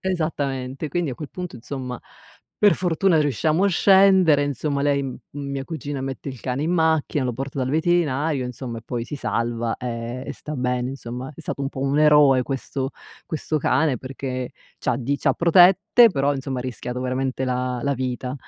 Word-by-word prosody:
Esattamente, 145 -6 -2
quindi 170 -1 -1
a - - -4
quel 150 0 -7
punto 180 -8 -6
insomma 125 0 -6 0.6
per 205 -2 +6
fortuna 175 -1 +2
riusciamo 155 - +1
a 200 - +4
scendere, 190 -5 +5
insomma 145 0 -1
lei 145 -1 +2
m 130 -2 -5
mia 140 -1 -4
cugina 145 -3 -5
mette 135 +1 -5
il 130 -3 -7
cane 130 +2 -2
in 165 - 0
macchina, 160 -4 +1
lo 125 -1 -1
porta 135 +3 -5
dal 130 - -1
veterinario 155 -4 +1
insomma 125 -1 -6
e - - -13
poi 120 -1 -3
si 135 - -7
salva 115 -2 -2
e 115 -2 -4 0.2
e - - -4
sta 150 - -7
bene 125 -1 -1
insomma. 130 +1 -6
È - - -11
stato - - -4
un 135 - -1
po' 135 - -7
un 140 +2 +1
eroe 150 -4 +6
questo 135 +1 -3 0.4
questo 155 -1 -1
cane 135 0 +2
perché 130 0 -5 0.3
c'ha - - 0
di 135 +3 -1
c'ha - - +2
protette, 190 +7 +6
però 140 -2 +1
insomma 135 -1 -4
ha 125 - -3
rischiato 125 0 -5
veramente 130 +1 -1
la 125 0 -1
la 140 - +1
vita. 125 0 -3
135 Hz, 185 wpm, -23 LUFS, 125-155 Hz, 0.6 s, per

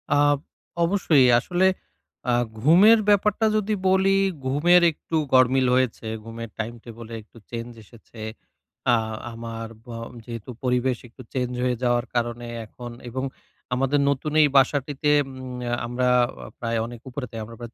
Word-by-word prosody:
আ - - +4 0.7
অবশ্যই 165 -7 +4
আসলে 180 +6 +2 0.6
আ - - +3 0.3
ঘুমের 195 - +7
ব্যাপারটা 210 +2 +3
যদি 215 0 +1 0.2
বলি 190 +1 +4 0.3
ঘুমের 170 +6 +5
একটু 160 - -6 0.2
গরমিল 130 0 +5
হয়েছে, 125 -3 0 0.2
ঘুমের 115 0 -7
টাইম-টেবল 115 0 -7
একটু 110 +2 -20
চেঞ্জ 120 0 -5
এসেছে। 110 +1 -15 0.7
আ - - +6 0.4
আমার 115 0 -6 0.2
ব্য - - -15 0.4
যেহেতু 115 -1 -8
পরিবেশ 125 0 +1
একটু 120 +2 -14
চেঞ্জ 125 -2 -1
হয়ে 125 -1 +1
যাওয়ার 120 0 +2
কারণে 120 0 -1 0.2
এখন 120 +2 -9 0.2
এবং 130 +2 -4 0.5
আমাদের 135 +3 +1
নতুন 140 +2 -1
এই 150 - +6
বাসাটিতে 145 +2 +2 0.2
উম 130 -2 -8 0.3
আমরা 125 +1 0 0.5
প্রায় 115 -1 -1
অনেক 120 -1 -9
উপরে 130 +1 -5 0.2
আমরা 115 +1 -11
প্রায় 120 0 -8
125 Hz, 135 wpm, -24 LUFS, 120-145 Hz, 0.7 s, ঘুমের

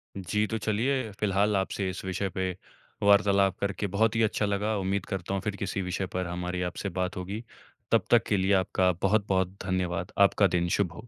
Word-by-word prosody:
जी। 100 +3 0
तो 110 - -2
चलिए 110 +3 0
फ़िलहाल 100 0 +2
आपसे 95 0 -1
इस 95 - -6
विषय 95 +1 -2
पे 95 0 -2 0.5
वार्तालाप 100 -2 +4
करके 100 +1 -2
बहुत 110 +1 +3
ही 115 - +2
अच्छा 110 -1 +1
लगा। 105 +2 0
उम्मीद 95 +1 -1
करता 95 -1 -4
हूँ 100 - -1
फ़िर 105 0 -3
किसी 100 0 -3
विषय 90 +1 -2
पर 90 -1 -1
हमारी 90 +1 -3
आपसे 100 - -4
बात 90 -1 -2
होगी। 100 +5 -5 0.5
तब - - +3
तक - - +6
के 100 - +2
लिए 95 +1 +2
आपका 90 0 +2
बहुत-बहुत 95 -2 +1
धन्यवाद। 90 -1 -1
आपका 100 0 +5
दिन 85 0 0
शुभ 90 -5 0
हो। 110 +7 -11
100 Hz, 195 wpm, -28 LUFS, 95-105 Hz, 0.5 s, तक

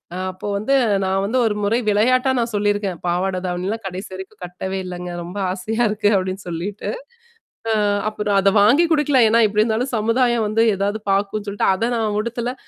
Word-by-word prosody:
அ - - -4
அப்போ 185 +2 -8
வந்து 220 +7 -1 0.3
நான் 190 +1 0
வந்து 235 +6 -1
ஒரு 210 - 0
முறை 220 +4 +2
விளையாட்டா 255 +5 +3
நான் 230 0 -1
சொல்லியிருக்கேன். 205 -3 0
பாவாட 185 +2 0
தாவணிலாம் 185 +5 -3
கடைசி 190 +3 -7
வரைக்கும் 190 +2 -10
கட்டவே 190 +2 -5
இல்லங்க. 180 0 -6
ரொம்ப 180 +4 -8
ஆசையா 220 +6 -2
இருக்கு 210 0 +1
அப்படின்னு 185 +1 -3
சொல்லிட்டு. 185 +5 -4 0.8
அ - - +2 0.4
அப்புறம் 210 -1 -2
அத 195 0 +4
வாங்கி 245 +11 +5
குடுக்கல. 290 -3 +3
ஏன்னா, 230 - +4
எப்படி 210 +1 +1
இருந்தாலும் 235 +4 -1
சமுதாயம் 230 +1 +1
வந்து 225 +2 +2
ஏதாவது 200 +3 -1
பார்க்கும்னு 200 +2 -1
சொல்லிட்டு 200 0 0
அத 230 +5 -1
நான் 215 -2 -1
உடுத்தல. 235 +2 -3
205 Hz, 175 wpm, -20 LUFS, 190-225 Hz, 0.8 s, வாங்கி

